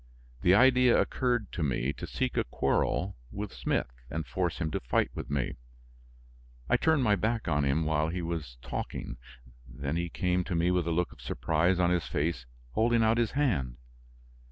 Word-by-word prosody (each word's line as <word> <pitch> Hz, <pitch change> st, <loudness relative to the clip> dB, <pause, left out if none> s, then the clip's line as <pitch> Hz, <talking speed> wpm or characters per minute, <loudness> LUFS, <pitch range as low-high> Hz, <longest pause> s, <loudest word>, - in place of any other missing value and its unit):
The 90 Hz, +5 st, +5 dB
idea 125 Hz, +1 st, +6 dB
occurred 120 Hz, -5 st, 0 dB
to 90 Hz, -, -4 dB
me 65 Hz, -2 st, 0 dB
to -, -, -7 dB
seek -, -, -2 dB
a -, -, +2 dB
quarrel 70 Hz, +8 st, 0 dB
with 100 Hz, -1 st, -5 dB
Smith -, -, -1 dB, 0.2 s
and 80 Hz, +2 st, -3 dB
force 90 Hz, -3 st, -1 dB
him 80 Hz, -2 st, -2 dB
to -, -, -1 dB
fight -, -, 0 dB
with -, -, -6 dB
me; 70 Hz, -3 st, -1 dB, 1.1 s
I -, -, +3 dB
turned 160 Hz, -4 st, +3 dB
my 105 Hz, -4 st, +4 dB
back 115 Hz, +2 st, -1 dB
on 75 Hz, -1 st, +2 dB
him 75 Hz, +4 st, +1 dB
while 80 Hz, 0 st, +1 dB
he 90 Hz, +1 st, -3 dB
was 80 Hz, -7 st, -4 dB
talking; -, -, -5 dB, 0.5 s
then 70 Hz, +6 st, -3 dB
he 85 Hz, 0 st, -1 dB
came 90 Hz, +1 st, 0 dB
to 85 Hz, -, -2 dB
me 85 Hz, +2 st, +2 dB
with 90 Hz, -2 st, +1 dB
a -, -, +1 dB
look 85 Hz, +1 st, 0 dB
of -, -, -15 dB
surprise 85 Hz, +3 st, +1 dB
on 90 Hz, -1 st, +3 dB
his 90 Hz, -2 st, 0 dB
face, 75 Hz, -5 st, -2 dB, 0.2 s
holding 115 Hz, -, +3 dB
out 110 Hz, +1 st, +3 dB
his 115 Hz, -2 st, 0 dB
hand. 85 Hz, -, 0 dB
85 Hz, 185 wpm, -29 LUFS, 75-105 Hz, 1.1 s, idea